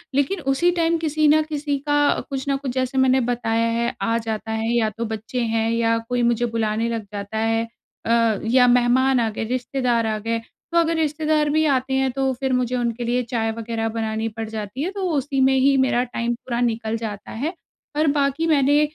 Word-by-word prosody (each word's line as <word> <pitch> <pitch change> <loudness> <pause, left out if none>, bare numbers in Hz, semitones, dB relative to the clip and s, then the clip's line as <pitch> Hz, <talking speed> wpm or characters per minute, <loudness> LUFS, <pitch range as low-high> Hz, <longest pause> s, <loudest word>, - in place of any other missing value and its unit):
लेकिन 285 +8 +1
उसी 345 +6 +2
टाइम 335 0 +2
किसी 310 -1 +1
न 305 +1 +5
किसी 290 -1 -1
का 290 0 +3
कुछ 270 -1 -4
न 275 - +2
कुछ 270 -2 -4
जैसे 260 0 -1
मैंने 260 0 +4
बताया 230 -1 0
है 235 +1 -1
आ 230 0 +1
जाता 225 -1 -4
है 220 +1 -1
या 225 -2 +2
तो 230 - -2
बच्चे 225 +3 -4
हैं 225 -1 0
या 230 0 +2
कोई 245 0 0
मुझे 235 0 +2
बुलाने 225 0 -1
लग 230 -1 -3
जाता 200 +1 -5
है 225 +1 +1 0.4
अ, 230 -2 +2
या 250 +2 +4
मेहमान 250 +2 +4
आ 230 -2 +1
गए 220 - -4
रिश्तेदार 245 0 0
आ 215 -1 -1
गए। 230 +2 -2 0.3
तो 340 - +1
अगर 335 0 +3
रिश्तेदार 305 -1 +1
भी 310 +2 +2
आते 265 -2 +1
हैं 265 0 +2
तो 270 +1 0
फिर 265 -1 0
मुझे 250 0 0
उनके 240 -1 -2
लिए 240 +1 +1
चाय 225 -2 -1
वग़ैरह 225 0 -3
बनानी 220 0 -2
पड़ 225 -1 -3
जाती 220 +3 -5
है। 365 - -2
तो 395 0 -6
उसी 280 -2 -1
में 265 0 +4
ही 275 +1 +4
मेरा 260 -2 +2
टाइम 240 -1 -2
पूरा 235 0 -4
निकल 225 -2 -1
जाता 215 -3 -6
है। 285 +10 -3 0.4
और 305 +1 +3
बाकी 280 +3 +1
मैंने 290 -1 +4
245 Hz, 210 wpm, -22 LUFS, 225-275 Hz, 0.4 s, न